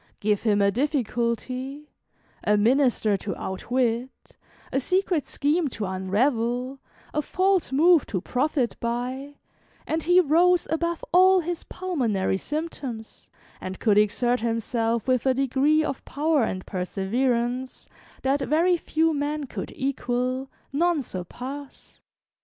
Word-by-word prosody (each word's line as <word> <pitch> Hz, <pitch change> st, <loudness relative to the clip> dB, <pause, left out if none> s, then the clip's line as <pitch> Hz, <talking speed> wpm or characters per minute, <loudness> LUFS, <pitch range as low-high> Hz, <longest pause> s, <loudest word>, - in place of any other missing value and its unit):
Give 210 Hz, -1 st, +1 dB
him 205 Hz, -3 st, +2 dB
a 200 Hz, -, +4 dB
difficulty, 255 Hz, +2 st, -2 dB, 0.5 s
a 210 Hz, 0 st, +3 dB
minister 230 Hz, -2 st, +3 dB
to 195 Hz, +1 st, -5 dB
outwit, 240 Hz, +5 st, -2 dB, 0.4 s
a 270 Hz, -, +1 dB
secret 365 Hz, +1 st, 0 dB
scheme 305 Hz, +3 st, +1 dB
to 220 Hz, -5 st, -4 dB
unravel, 235 Hz, +7 st, 0 dB, 0.3 s
a 300 Hz, -, +1 dB
false 375 Hz, +2 st, +1 dB
move 325 Hz, +3 st, +5 dB
to 190 Hz, -, -2 dB
profit 255 Hz, -, 0 dB
by, 255 Hz, +4 st, -3 dB, 0.5 s
and 320 Hz, +1 st, -1 dB
he 355 Hz, +3 st, +5 dB
rose 350 Hz, +2 st, +4 dB
above 335 Hz, +1 st, -1 dB
all 370 Hz, +1 st, +6 dB
his 345 Hz, 0 st, -4 dB
pulmonary 235 Hz, -, -1 dB
symptoms, 275 Hz, -5 st, -6 dB, 0.3 s
and 185 Hz, 0 st, -6 dB
could 210 Hz, -2 st, +4 dB
exert 240 Hz, +4 st, +2 dB
himself 230 Hz, 0 st, -1 dB
with 255 Hz, 0 st, +2 dB
a 260 Hz, -, +3 dB
degree 275 Hz, +4 st, +2 dB
of 275 Hz, -3 st, -4 dB
power 295 Hz, -3 st, +1 dB
and 185 Hz, 0 st, -4 dB
perseverance 240 Hz, +7 st, -1 dB, 0.4 s
that 270 Hz, +2 st, +2 dB
very 335 Hz, +6 st, +3 dB
few 320 Hz, 0 st, +1 dB
men 295 Hz, +1 st, -2 dB
could -, -, -6 dB
equal, 255 Hz, 0 st, -2 dB, 0.2 s
none 330 Hz, 0 st, +2 dB
surpass. 255 Hz, +9 st, -8 dB
260 Hz, 125 wpm, -25 LUFS, 230-305 Hz, 0.5 s, all